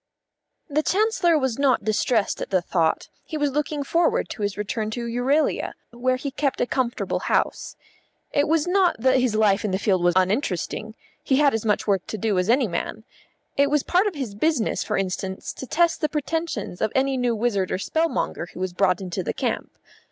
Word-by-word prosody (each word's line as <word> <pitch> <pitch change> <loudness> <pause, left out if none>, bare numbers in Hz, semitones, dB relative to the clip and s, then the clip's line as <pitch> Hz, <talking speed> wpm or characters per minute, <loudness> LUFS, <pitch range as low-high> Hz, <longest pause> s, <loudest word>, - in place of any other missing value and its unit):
The 300 -1 +1
Chancellor 385 -1 +2
was 265 -4 -1
not 275 -2 +3
distressed 215 0 +1
at - - -4
the 190 - +3
thought; 170 -2 0 0.2
he 315 - -5
was 290 -2 +1
looking 295 +1 -1
forward 335 +4 +1
to - - -7
his 205 -1 -1
return 215 +1 -2
to 235 +2 -4
Euralia, 250 +6 +1 0.2
where 250 +2 0
he 275 +2 -4
kept 280 0 -1
a - - +2
comfortable 250 -1 -1
house. - - -1 0.6
It 285 - +2
was 315 -1 +2
not 365 0 +3
that 260 +3 +3
his 250 -4 +1
life 210 -2 +3
in 210 - 0
the 190 - 0
field 190 -2 +1
was 175 0 +3
uninteresting; 205 - -1 0.3
he 265 - +2
had 285 0 +4
as 225 0 -2
much 210 -1 +1
work 195 -3 0
to 220 - -4
do 205 -2 +1
as 180 +3 -1
any 250 0 +4
man. 175 +4 -4 0.5
It 280 0 +4
was 295 -1 +2
part 370 +4 +2
of 395 - -3
his 260 -8 -4
business, 250 +2 0
for - - -1
instance, 190 0 -3
to 265 - -8
test 335 +3 +2
the 305 - +1
pretentions 300 - -3
of 215 - +1
any 270 0 +2
new 245 -2 +1
wizard 210 -4 0
or - - 0
spell 320 - 0
monger 175 - -2
who - - -7
was 185 -1 -2
brought 185 0 +2
into 185 0 -3
the - - -3
camp. - - -2
245 Hz, 205 wpm, -24 LUFS, 200-295 Hz, 0.6 s, had